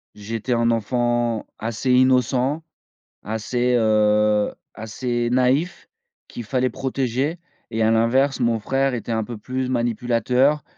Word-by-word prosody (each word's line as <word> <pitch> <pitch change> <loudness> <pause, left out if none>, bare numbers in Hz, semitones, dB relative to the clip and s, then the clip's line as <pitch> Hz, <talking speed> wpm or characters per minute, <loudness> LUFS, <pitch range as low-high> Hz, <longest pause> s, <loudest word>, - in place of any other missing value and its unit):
j'étais 115 +4 -3
un 115 0 +2
enfant 120 0 0
assez 115 +3 -2
innocent, 130 +3 +2 0.6
assez, 120 +3 -1
heu, 105 -1 +3 0.2
assez 120 +2 -3
naïf 130 +7 +1 0.4
qu'il 120 - -8
fallait 125 +2 0
protéger 135 +4 -2 0.3
et 115 -1 -1
à 110 - +3
l'inverse 130 +5 +2
mon 120 -2 +1
frère 135 +4 0
était 115 0 -5
un 110 -1 0
peu 120 +1 -7
plus 130 +4 -4
manipulateur, 125 +4 +1
120 Hz, 120 wpm, -22 LUFS, 110-130 Hz, 0.6 s, heu